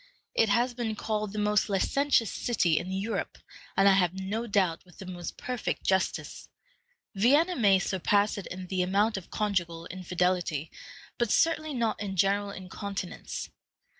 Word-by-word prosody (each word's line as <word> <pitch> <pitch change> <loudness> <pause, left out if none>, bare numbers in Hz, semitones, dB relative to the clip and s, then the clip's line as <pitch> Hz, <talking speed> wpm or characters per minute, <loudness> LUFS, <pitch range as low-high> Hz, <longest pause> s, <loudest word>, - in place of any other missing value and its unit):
It 225 - +3
has 240 +5 +2
been 235 -3 -3
called 215 -1 -2
the 210 - -7
most 210 0 +2
licentious 230 +3 +2
city 175 -9 +1
in 185 - -6
Europe, 195 +4 -3 0.4
and 195 - +6
I - - +8
have 185 -2 +2
no 215 +5 -3
doubt 190 -6 +1
with 180 -2 -20
the 190 - -9
most 175 -2 -6
perfect 250 -3 -3
justice. 190 0 -1 0.6
Vienna 290 - +4
may 200 -6 +5
surpass 200 +2 +1
it 195 - -7
in 185 +1 -6
the 185 0 -1
amount 200 +4 +2
of 190 -3 -6
conjugal 175 -6 -1
infidelity, 180 -4 -1 0.5
but 235 -2 +1
certainly 310 +2 +2
not 230 -4 0
in 195 -2 -3
general 200 +2 +2
incontinence. 195 0 -6
200 Hz, 155 wpm, -29 LUFS, 185-220 Hz, 0.6 s, I